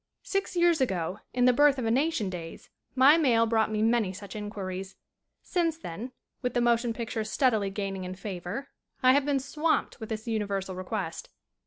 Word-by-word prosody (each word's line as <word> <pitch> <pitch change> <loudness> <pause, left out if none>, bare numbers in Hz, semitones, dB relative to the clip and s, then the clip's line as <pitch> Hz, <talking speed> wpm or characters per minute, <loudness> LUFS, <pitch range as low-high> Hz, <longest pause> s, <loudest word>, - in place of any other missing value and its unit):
Six 390 -1 -2
years 345 -3 +3
ago 185 -6 -1
in 245 0 +2
"The 250 - +6
Birth 290 +2 +5
of 250 - -2
a 225 - +1
Nation" 260 -6 +1
days 165 -2 -8 0.2
my 275 +4 +7
mail 235 -7 +4
brought 220 -1 +2
me 215 0 0
many 225 -4 +2
such 195 +1 -9
inquiries. 195 -2 -5 0.5
Since 335 -3 0
then, 225 - -7 0.3
with 250 -2 -2
the - - +3
motion 240 0 +2
pic 230 +1 -5
ture 220 -3 -1
steadily 220 -2 +1
gaining 195 -1 -4
in 185 0 -5
favor, 190 +5 -5 0.3
I 255 0 +7
have 280 0 +3
been 285 -2 +1
swamped 300 +4 -1
with 220 - -7
this 220 0 -5
universal 200 -4 -2
request. 185 -2 -4
225 Hz, 185 wpm, -28 LUFS, 195-260 Hz, 0.5 s, my